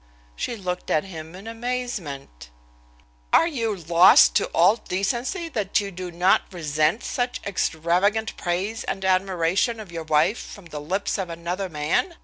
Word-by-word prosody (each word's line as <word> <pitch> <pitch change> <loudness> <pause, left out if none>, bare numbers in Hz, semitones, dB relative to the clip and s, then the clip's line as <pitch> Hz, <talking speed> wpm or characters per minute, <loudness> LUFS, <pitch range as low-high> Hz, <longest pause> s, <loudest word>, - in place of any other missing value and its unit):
She 240 - -3
looked 180 -4 -4
at 155 - +2
him 165 -3 -9
in 195 +3 -11
amazement. 225 - -5 0.8
"Are - - +6
you 230 -10 -1
lost 170 0 +6
to - - 0
all 180 +7 +4
decency 240 - -2
that 210 -9 0
you 200 -1 -4
do 180 0 -6
not 180 +4 +2
resent 155 - 0
such 245 0 -2
extravagant 195 +4 0
praise 190 +6 -2
and 195 - -4
admiration 190 +3 +1
of 205 -5 -9
your 165 -1 -5
wife 155 +8 +2
from 200 - -10
the 155 -3 -7
lips 190 +8 -2
of 185 -2 -3
another 175 +3 -4
man?" 155 - -1
185 Hz, 150 wpm, -24 LUFS, 170-220 Hz, 0.8 s, Are